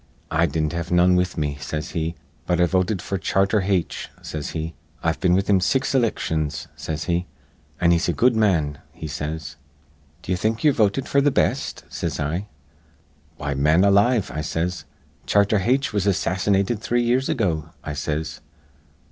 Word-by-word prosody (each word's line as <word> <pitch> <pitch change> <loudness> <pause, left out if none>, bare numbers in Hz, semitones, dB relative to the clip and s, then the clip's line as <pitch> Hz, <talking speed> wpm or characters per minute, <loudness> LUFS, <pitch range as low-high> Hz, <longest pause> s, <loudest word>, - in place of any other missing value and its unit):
'I 85 +2 +3
didn't 80 +1 -1
have 85 0 -3
none 90 +1 +4
with 90 -1 0
me,' 75 -2 -2
says 75 +2 -4
he, 80 0 -2 0.3
'but 90 -1 +1
I 90 - +5
voted 95 +2 0
f'r 95 -1 -3
Charter 95 +2 +2
Haitch,' 95 -3 -1
says 75 -2 -5
he. 80 0 -4 0.3
'I've 80 0 0
been 90 -2 +3
with 95 +1 +1
him 100 - +5
in - - 0
six 135 +10 +1
ilictions,' 80 - 0
says 80 0 -4
he, 85 +1 -1 0.5
'an' 85 -1 +4
he's 85 0 +2
a - - +2
good 120 - +3
man,' 85 -10 +2
he 80 -1 -8
says. 75 0 -5 0.7
'D'ye 90 - -1
think 110 +4 -1
ye're 150 -2 +5
votin' 110 +4 +2
f'r 140 - +2
th' 145 - +4
best?' - - 0
says - - -4
I. 85 +8 -2 0.9
'Why, 70 -1 -2
man 75 +6 +3
alive,' 100 +2 +3
I 75 - -2
says, 85 +3 -2 0.4
'Charter 100 +1 +3
Haitch 125 +6 +1
was 100 -1 0
assassinated 100 +3 +1
three 120 +1 +1
years 125 +3 +1
ago,' 85 - 0
I 75 - -4
says. 75 +2 -3
90 Hz, 175 wpm, -23 LUFS, 80-100 Hz, 0.9 s, I